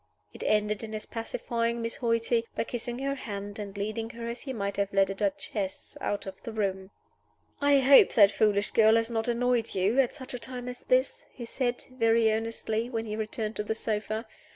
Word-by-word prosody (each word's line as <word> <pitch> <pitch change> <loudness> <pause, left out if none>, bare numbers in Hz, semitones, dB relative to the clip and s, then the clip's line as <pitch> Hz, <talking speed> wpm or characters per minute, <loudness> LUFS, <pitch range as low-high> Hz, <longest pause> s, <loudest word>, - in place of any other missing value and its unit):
It - - -11
ended 210 0 +1
in 220 0 -6
his 215 - -4
pacifying 230 0 -2
Miss 230 0 -3
Hoighty, 230 -1 +1
by - - 0
kissing 240 0 -4
her 275 +1 -1
hand, 205 -5 -6
and 200 -1 -6
leading 215 +2 -3
her 235 -1 -7
(as 235 - -6
he 270 - -5
might 200 -5 -3
have 200 0 0
led 195 0 +3
a - - -2
duchess) 235 -6 -3
out 205 - -2
of 190 -1 -8
the 230 - -6
room. 190 -3 -2 0.7
"I 285 0 +5
hope 270 +1 +7
that 205 -3 +7
foolish 205 0 +2
girl 220 0 +6
has 230 +1 +1
not 225 0 -1
annoyed 240 -1 +1
you 195 +7 +2
at 260 -3 +2
such 265 -2 -8
a 250 - -4
time 250 0 -6
as 250 0 -5
this," - - +1
he 240 - -8
said, 245 0 -2
very 230 -2 +3
earnestly, 225 +1 -2
when 225 -2 -2
he 215 -1 -4
returned 220 0 -3
to 210 - -1
the 220 +1 -2
sofa. 220 +1 -2
225 Hz, 205 wpm, -28 LUFS, 210-240 Hz, 0.7 s, hope